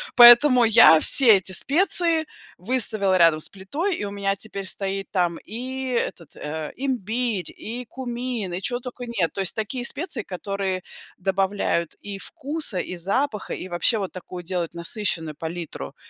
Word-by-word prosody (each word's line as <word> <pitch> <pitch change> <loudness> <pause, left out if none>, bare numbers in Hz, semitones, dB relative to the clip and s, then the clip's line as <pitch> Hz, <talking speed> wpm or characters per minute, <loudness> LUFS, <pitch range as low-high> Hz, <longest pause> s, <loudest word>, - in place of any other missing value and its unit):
Поэтому 245 +1 +9
я 210 -8 +7
все 235 - +6
эти 190 0 -2
специи 330 - +3 0.3
выставила 205 -2 +1
рядом 165 -2 +5
с - - -1
плитой 290 - -3
и - - -5
у - - -4
меня 200 -1 -1
теперь 200 -1 -5
стоит 195 +1 -2
там 175 -3 0
и 255 +4 -5
этот, 180 -8 -3
э, 155 0 -6
имбирь, 240 -5 -2
и 240 +3 -7
кумин, 240 -6 -5
и 180 - -4
чё 245 +4 -1
тока 250 0 -8
нет. 190 -10 -1
То 195 - -3
есть 190 - -2
такие 240 +3 -3
специи, 280 - -1
которые 190 0 -4 0.4
добавляют 190 -3 -1
и 205 -1 -7
вкуса, 300 - -2
и 180 - -4
запаха, 210 +5 -1
и - - -6
вообще 190 +6 +1
вот 195 - -4
такую 180 -1 -9
делают 175 -1 -3
насыщенную 170 -3 -2
палитру. 160 - -6
200 Hz, 155 wpm, -23 LUFS, 180-245 Hz, 0.4 s, Поэтому